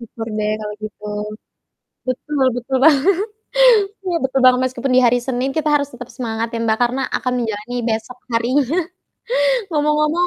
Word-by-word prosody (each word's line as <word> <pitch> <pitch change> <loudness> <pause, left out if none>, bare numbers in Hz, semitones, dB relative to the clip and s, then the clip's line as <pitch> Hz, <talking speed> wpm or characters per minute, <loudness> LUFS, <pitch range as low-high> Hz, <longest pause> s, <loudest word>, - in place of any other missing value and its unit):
Syukur 225 -1 -7
deh 210 0 0
kalau 210 0 -5
gitu. 210 0 -8 1.0
Betul 270 +2 -1
betul 245 +2 -3
banget. 320 +5 +5 0.9
Iya 355 -2 0
betul 265 0 +1
banget, 255 0 +6
meskipun 255 +1 -2
di - - +7
hari 245 +1 +4
Senin 260 0 -1
kita 310 -1 +1
harus 285 -1 +2
tetap 245 0 -9
semangat 230 -2 -2
ya 230 - -4
Mbak, 220 -1 +1
karena 245 +2 +1 0.2
akan 250 - -2
menjalani 225 +1 -3
besok 225 +3 -3 0.2
harinya. 250 +4 +2 1.1
Ngomong-ngomong 300 +3 +2
250 Hz, 150 wpm, -19 LUFS, 230-285 Hz, 1.1 s, di